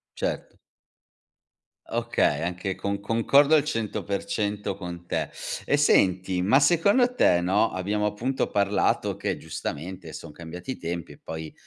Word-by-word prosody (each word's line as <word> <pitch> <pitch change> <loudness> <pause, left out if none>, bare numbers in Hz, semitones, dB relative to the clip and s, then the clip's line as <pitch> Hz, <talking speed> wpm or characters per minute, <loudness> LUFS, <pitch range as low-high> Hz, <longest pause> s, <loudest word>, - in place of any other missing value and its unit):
Certo. - - -3 1.4
Okay, 75 +2 +1
anche 90 +2 -3
con 100 0 -3
concordo 140 +8 +4
al 145 - +3
100% 105 -4 -2
con 90 -2 -8
te. - - -2 0.3
E 145 - +2
senti, 95 -9 +3
ma 110 +10 +4
secondo 200 - +4
te 90 - +4
no, 100 +5 +2
abbiamo 105 +3 -1
appunto 120 +6 -1
parlato 100 0 +1
che - - -2
giustamente 85 +1 -6
son 80 - -8
cambiati 85 - -7
i - - -9
tempi 85 0 -5
e - - -15
poi, 80 -1 -7
100 Hz, 135 wpm, -26 LUFS, 90-115 Hz, 1.4 s, concordo